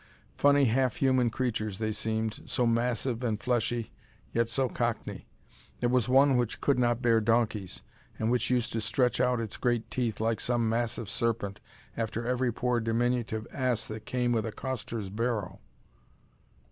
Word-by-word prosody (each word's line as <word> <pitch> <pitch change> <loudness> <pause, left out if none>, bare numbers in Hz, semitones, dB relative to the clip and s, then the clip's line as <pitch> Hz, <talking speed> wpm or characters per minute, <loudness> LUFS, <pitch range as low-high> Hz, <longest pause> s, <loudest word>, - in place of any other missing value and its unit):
Funny 145 -1 +5
half 125 +1 +2
human 130 -3 +3
creatures 110 -5 -2
they 110 0 -1
seemed, 110 0 -2
so 125 - +1
massive 120 +1 0
and 110 -3 0
fleshy, 120 -1 -1 0.4
yet 115 0 +1
so 130 +3 +1
Cockney. 120 -2 -3 0.5
There 120 - +1
was 125 -1 +2
one 135 0 +5
which 120 -2 -1
could 140 -3 +2
not 120 0 +1
bear 115 -2 +4
donkeys, 110 -4 0 0.3
and 110 +1 0
which 125 - +1
used 125 -2 +1
to 115 - -1
stretch 125 +4 +1
out 125 -1 +2
its 110 -3 -4
great 120 -2 0
teeth 120 -5 -1
like 110 0 0
some 120 -2 +1
massive 115 -1 -1
serpent 105 -2 -1 0.3
after 115 0 -3
every 125 0 +1
poor 125 +1 0
diminutive 115 -1 0
ass 130 -4 0
that 110 0 -7
came 125 -1 0
with 115 -1 +1
a - - -3
coster's 115 -5 -4
barrow. 115 -2 -2
115 Hz, 160 wpm, -29 LUFS, 110-125 Hz, 0.5 s, Funny